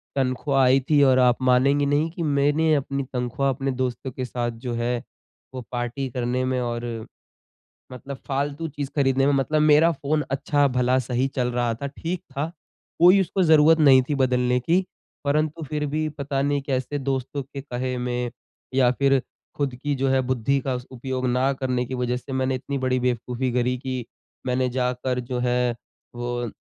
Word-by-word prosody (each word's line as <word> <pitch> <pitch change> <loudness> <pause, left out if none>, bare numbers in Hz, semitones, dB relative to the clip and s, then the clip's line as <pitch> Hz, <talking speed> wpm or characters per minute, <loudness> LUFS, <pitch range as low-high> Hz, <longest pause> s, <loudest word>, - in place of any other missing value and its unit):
तनख़्वाह 135 +1 +1
आयी 130 +1 +5
थी 150 -2 +5
और 130 -1 +5
आप 125 -1 +4
मानेंगी 130 +3 +3
नहीं 145 +3 +1
कि 170 0 -4
मैंने 145 +2 +2
अपनी 140 -1 -2
तनख़्वाह 125 +2 -1
अपने 135 +1 -1
दोस्तों 130 0 -3
के 130 +1 -4
साथ 120 -1 -2
जो 120 - -2
है 120 +1 0 0.6
वो 130 - -5
पार्टी 120 +2 -3
करने 125 +1 -1
में 130 0 0
और, 120 -2 -4 0.8
मतलब 135 +2 -7
फ़ालतू 145 +3 -2
चीज़ 145 -2 -5
ख़रीदने 135 -2 +2
में 145 - +3
मतलब 145 +3 +1
मेरा 155 +2 +5
फ़ोन 150 0 -1
अच्छा 140 +1 +2
भला 125 0 +2
सही 125 +1 0
चल 125 -2 +1
रहा 120 -1 0
था, 140 +5 -5
ठीक 165 +5 -4
था। 150 +4 -3 0.5
कोई 180 +4 +7
उसको 190 +1 0
ज़रूरत 160 0 +6
नहीं 135 -4 +7
थी 145 - +1
बदलने 125 -2 +2
की। 175 +9 +1 0.4
परंतु 155 +3 0
फ़िर 150 0 -2
भी 155 +2 -1
पता 140 -2 -3
नहीं 145 0 +1
कैसे 135 +1 -2
दोस्तों 135 +1 -2
के 140 +1 -8
कहे 125 -1 -3
में 125 -1 -2 0.4
या 130 -2 +4
फ़िर 135 +1 +3 0.4
ख़ुद 140 -3 -1
की 145 +4 -2
जो 135 0 0
है 130 0 +3
बुद्धि 130 +3 +1
का 130 0 -2
उस 125 0 -6
उपयोग 130 0 -3
ना 125 +2 +2
करने 130 -2 -1
की 130 - -7
वजह 125 0 -1
से 125 - -10
मैंने 130 0 0
इतनी 140 +2 -4
बड़ी 130 -1 0
बेवकूफ़ी 125 +1 -1
करी 125 +1 +1
कि 130 -2 -4 0.4
मैंने 125 0 +1
जाकर 125 0 -1
जो 125 0 -3
है 125 -1 +1 0.4
वो, 120 -1 -3
130 Hz, 180 wpm, -24 LUFS, 125-140 Hz, 0.8 s, कोई